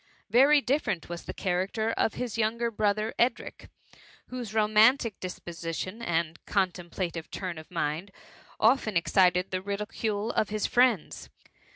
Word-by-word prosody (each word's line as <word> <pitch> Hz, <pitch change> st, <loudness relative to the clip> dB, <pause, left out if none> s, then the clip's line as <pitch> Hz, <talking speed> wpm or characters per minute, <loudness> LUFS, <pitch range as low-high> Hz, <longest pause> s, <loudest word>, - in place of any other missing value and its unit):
Very 280 Hz, +5 st, +6 dB
different 230 Hz, -, -1 dB
was 175 Hz, 0 st, -6 dB
the -, -, -5 dB
character 195 Hz, +4 st, -1 dB
of 225 Hz, -, 0 dB
his 250 Hz, -3 st, -4 dB
younger 230 Hz, +1 st, 0 dB
brother 215 Hz, 0 st, 0 dB
Edric, 240 Hz, +2 st, -1 dB, 0.6 s
whose 245 Hz, -4 st, -6 dB
romantic 220 Hz, +1 st, +3 dB
disposition 175 Hz, +3 st, -5 dB
and 170 Hz, -5 st, -2 dB
contemplative 175 Hz, -3 st, -2 dB
turn 180 Hz, -4 st, -5 dB
of 155 Hz, -, -13 dB
mind 165 Hz, +2 st, -2 dB, 0.5 s
otten 220 Hz, -4 st, +3 dB
excited 180 Hz, +1 st, +3 dB
the 185 Hz, 0 st, -1 dB
ridicule 210 Hz, +2 st, -3 dB
of 215 Hz, -, 0 dB
his 215 Hz, 0 st, -1 dB
friends. 250 Hz, 0 st, +1 dB
205 Hz, 130 wpm, -28 LUFS, 180-230 Hz, 0.6 s, Very